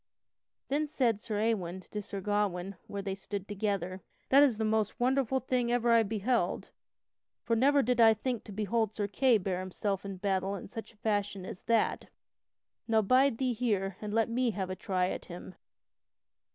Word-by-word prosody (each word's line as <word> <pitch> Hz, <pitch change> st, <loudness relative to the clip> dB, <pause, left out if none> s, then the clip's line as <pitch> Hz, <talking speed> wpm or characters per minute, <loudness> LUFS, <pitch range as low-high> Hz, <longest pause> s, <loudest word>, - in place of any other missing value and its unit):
Then 295 Hz, +3 st, 0 dB
said 245 Hz, -8 st, +1 dB
Sir 215 Hz, -2 st, -3 dB
Ewain 190 Hz, -5 st, -1 dB
to 210 Hz, -, -3 dB
Sir 200 Hz, -1 st, -6 dB
Gawain 195 Hz, -2 st, -1 dB
where 200 Hz, -1 st, -5 dB
they 195 Hz, -1 st, -2 dB
stood 200 Hz, 0 st, -6 dB
together: 195 Hz, -3 st, -2 dB, 0.3 s
"That 275 Hz, +2 st, +7 dB
is 265 Hz, -7 st, +4 dB
the 220 Hz, -, 0 dB
most 215 Hz, -1 st, 0 dB
wonderful 265 Hz, +1 st, +2 dB
thing 255 Hz, -2 st, 0 dB
that 240 Hz, -, 0 dB
ever 240 Hz, -1 st, +2 dB
I 230 Hz, 0 st, +6 dB
beheld, 215 Hz, -2 st, -1 dB, 0.7 s
for 230 Hz, -, +1 dB
never 280 Hz, +4 st, +4 dB
did 245 Hz, 0 st, +2 dB
I 225 Hz, -1 st, +7 dB
think 245 Hz, +1 st, -3 dB
to -, -, -9 dB
behold 215 Hz, +1 st, -1 dB
Sir 205 Hz, -1 st, -1 dB
Kay 245 Hz, +3 st, +3 dB
bear 185 Hz, -2 st, -2 dB
himself 190 Hz, +1 st, -3 dB
in 195 Hz, -1 st, -6 dB
battle 195 Hz, 0 st, -1 dB
in 190 Hz, -, -7 dB
such 225 Hz, +1 st, -8 dB
a 225 Hz, -, -27 dB
fashion 205 Hz, -3 st, -1 dB
as 185 Hz, -, -8 dB
that. 230 Hz, -1 st, +1 dB, 0.8 s
Now 220 Hz, -1 st, +3 dB
bide 255 Hz, +3 st, +4 dB
thee 255 Hz, -1 st, 0 dB
here 200 Hz, -5 st, -1 dB
and 210 Hz, -1 st, -4 dB
let 225 Hz, +1 st, +2 dB
me 240 Hz, +1 st, +1 dB
have 190 Hz, -3 st, -3 dB
a -, -, -3 dB
try 185 Hz, -1 st, 0 dB
at -, -, -5 dB
him." 180 Hz, +1 st, -9 dB
210 Hz, 190 wpm, -31 LUFS, 195-235 Hz, 0.8 s, That